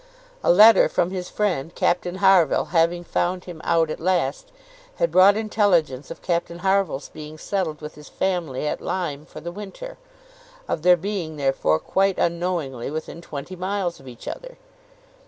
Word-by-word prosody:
A -, -, +5 dB
letter 210 Hz, +4 st, +7 dB
from 175 Hz, -, 0 dB
his 180 Hz, -2 st, -5 dB
friend, 175 Hz, -7 st, -2 dB
Captain 175 Hz, 0 st, 0 dB
Harville, 190 Hz, -5 st, +4 dB
having 170 Hz, +1 st, +2 dB
found 180 Hz, +1 st, -1 dB
him 170 Hz, -3 st, -9 dB
out 165 Hz, -2 st, +2 dB
at -, -, -5 dB
last, 185 Hz, -, -1 dB, 0.4 s
had -, -, 0 dB
brought 200 Hz, +3 st, +6 dB
intelligence 185 Hz, -, +1 dB
of -, -, -9 dB
Captain 170 Hz, -1 st, -1 dB
Harville's 190 Hz, -7 st, +1 dB
being 155 Hz, 0 st, -10 dB
settled 160 Hz, -3 st, -3 dB
with 150 Hz, 0 st, -7 dB
his 150 Hz, 0 st, -14 dB
family 175 Hz, -8 st, -2 dB
at -, -, -3 dB
Lyme 155 Hz, -5 st, -3 dB
for -, -, -10 dB
the 170 Hz, -, -6 dB
winter; 210 Hz, -, -9 dB, 0.7 s
of 155 Hz, -, -2 dB
their 180 Hz, +1 st, +6 dB
being 175 Hz, -3 st, -4 dB
therefore, 135 Hz, -, +1 dB
quite 195 Hz, -, 0 dB
unknowingly, 170 Hz, -8 st, -1 dB
within 160 Hz, +2 st, -6 dB
twenty 155 Hz, +3 st, -7 dB
miles 185 Hz, -1 st, -2 dB
of 135 Hz, -, -15 dB
each 120 Hz, -2 st, -11 dB
other. -, -, -7 dB
175 Hz, 160 wpm, -23 LUFS, 155-190 Hz, 0.7 s, letter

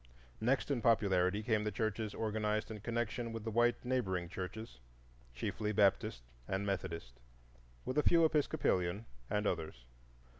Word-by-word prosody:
Next 130 Hz, +5 st, +1 dB
in 130 Hz, -4 st, 0 dB
popularity 100 Hz, -3 st, +3 dB
came 110 Hz, -2 st, +1 dB
the 105 Hz, -, -1 dB
churches 110 Hz, -1 st, -2 dB
organized 110 Hz, 0 st, -1 dB
in 110 Hz, -, -6 dB
connection 115 Hz, +1 st, -2 dB
with 115 Hz, -1 st, -5 dB
the 110 Hz, -, -3 dB
white 120 Hz, +2 st, +2 dB
neighboring 95 Hz, -9 st, 0 dB
churches, 95 Hz, -, -6 dB, 0.6 s
chiefly 105 Hz, -, -2 dB
Baptist 100 Hz, -, +2 dB, 0.2 s
and 95 Hz, +1 st, -1 dB
Methodist, 85 Hz, -10 st, -3 dB, 0.7 s
with 130 Hz, -, +1 dB
a -, -, +3 dB
few 165 Hz, -1 st, +6 dB
Episcopalian 115 Hz, -, +1 dB, 0.2 s
and 105 Hz, 0 st, 0 dB
others. 80 Hz, -10 st, -2 dB
105 Hz, 140 wpm, -35 LUFS, 95-115 Hz, 0.7 s, few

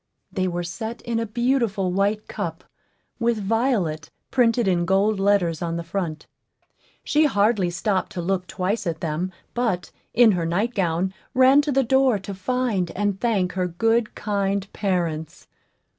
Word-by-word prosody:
They 185 Hz, -1 st, 0 dB
were 175 Hz, -1 st, -2 dB
set 220 Hz, +7 st, -6 dB
in 235 Hz, -1 st, -1 dB
a 230 Hz, -, -2 dB
beautiful 230 Hz, -5 st, 0 dB
white 200 Hz, +3 st, 0 dB
cup, -, -, -5 dB, 0.6 s
with 235 Hz, -1 st, +1 dB
VIOLET 205 Hz, -, 0 dB, 0.2 s
printed 240 Hz, -3 st, +3 dB
in 175 Hz, -2 st, +2 dB
gold 195 Hz, +3 st, +2 dB
letters 195 Hz, -5 st, +2 dB
on 170 Hz, -1 st, -2 dB
the 170 Hz, -, -4 dB
front. 165 Hz, -3 st, -4 dB, 0.8 s
She 305 Hz, +1 st, +3 dB
hardly 205 Hz, -7 st, +2 dB
stopped 190 Hz, +2 st, -1 dB
to 180 Hz, -, -3 dB
look 185 Hz, 0 st, -1 dB
twice 200 Hz, +4 st, -2 dB
at 165 Hz, -1 st, -3 dB
them, 165 Hz, +3 st, -2 dB, 0.2 s
but, 225 Hz, -7 st, -1 dB, 0.2 s
in 235 Hz, -2 st, +7 dB
her 175 Hz, -4 st, -1 dB
nightgown, 185 Hz, -2 st, 0 dB, 0.2 s
ran 260 Hz, +2 st, +6 dB
to 290 Hz, 0 st, -2 dB
the 270 Hz, 0 st, +3 dB
door 265 Hz, -1 st, +3 dB
to 195 Hz, +1 st, -7 dB
find 200 Hz, -2 st, -1 dB
and 205 Hz, -1 st, -1 dB
thank 200 Hz, -7 st, +1 dB
her 185 Hz, 0 st, -1 dB
good, 225 Hz, +6 st, +1 dB
kind 200 Hz, -1 st, -1 dB
parents. 170 Hz, -6 st, -2 dB
200 Hz, 155 wpm, -23 LUFS, 180-230 Hz, 0.8 s, in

